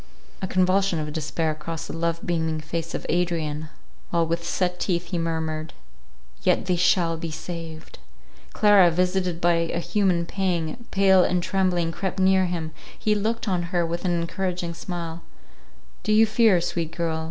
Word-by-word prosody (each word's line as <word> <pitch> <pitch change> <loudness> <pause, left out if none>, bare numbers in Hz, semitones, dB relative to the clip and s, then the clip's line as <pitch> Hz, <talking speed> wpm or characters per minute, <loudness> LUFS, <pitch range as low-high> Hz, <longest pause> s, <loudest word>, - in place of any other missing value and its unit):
A 190 - -1
convulsion 185 0 +2
of 150 -1 -3
despair 160 +1 -1
crossed 165 +1 -6
the - - -6
love 165 0 -2
beaming 160 -2 0
face 165 +1 -4
of - - -5
Adrian, 160 -3 -1 0.4
while 170 -1 +2
with 170 +1 -2
set 180 +1 -1
teeth 175 -2 -1
he 175 - 0
murmured, 160 -1 -2 0.7
"Yet - - +2
they 180 - +1
shall 170 -1 +2
be 165 +1 -4
saved!" 160 0 -7 0.5
Clara, 205 -4 +6
visited 180 0 0
by 175 0 +3
an 165 0 0
human 185 -5 +1
pang, 180 +3 -2
pale 190 -1 +5
and 180 -1 +1
trembling, 180 -4 +1
crept 190 +2 -3
near 190 0 +4
him—he 170 +5 -3
looked 220 +3 -1
on 185 -3 +1
her 175 -3 +1
with 170 +1 -3
an 175 -2 +1
encouraging 175 0 -2
smile—"Do 170 +4 -8
you 220 +1 +7
fear, 220 -4 +4
sweet 170 -2 -2
girl? 165 -2 -1
170 Hz, 155 wpm, -24 LUFS, 165-185 Hz, 0.7 s, you